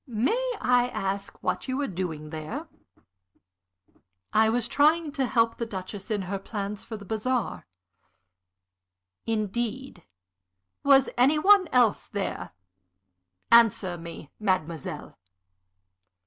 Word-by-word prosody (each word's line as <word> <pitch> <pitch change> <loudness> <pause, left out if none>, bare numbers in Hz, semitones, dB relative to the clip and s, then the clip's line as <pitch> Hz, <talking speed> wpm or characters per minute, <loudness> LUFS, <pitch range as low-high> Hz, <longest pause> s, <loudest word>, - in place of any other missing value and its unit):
May 355 - 0
I 245 0 +3
ask 195 -3 -3
what - - -1
you 260 0 -1
were 285 - 0
doing 165 - -5
there?" 190 - -6 1.7
"I 220 +1 +5
was 240 +1 +1
trying 305 +4 +3
to 275 -3 -1
help 230 -2 +2
the 235 - -2
Duchess 195 -1 -7
in 210 -3 -1
her 195 +2 -3
plans 205 0 -5
for 220 - -7
the 205 - -11
bazaar." 225 - -2 1.6
"Indeed? 225 0 -2 0.8
Was 275 -1 +6
any 275 +5 +5
one 385 +3 +6
else 245 -7 +2
there? 200 -1 -4 1.0
Answer 225 -6 +5
me, 165 -3 -9
mademoiselle." 170 -7 -3
225 Hz, 110 wpm, -27 LUFS, 195-260 Hz, 1.7 s, Was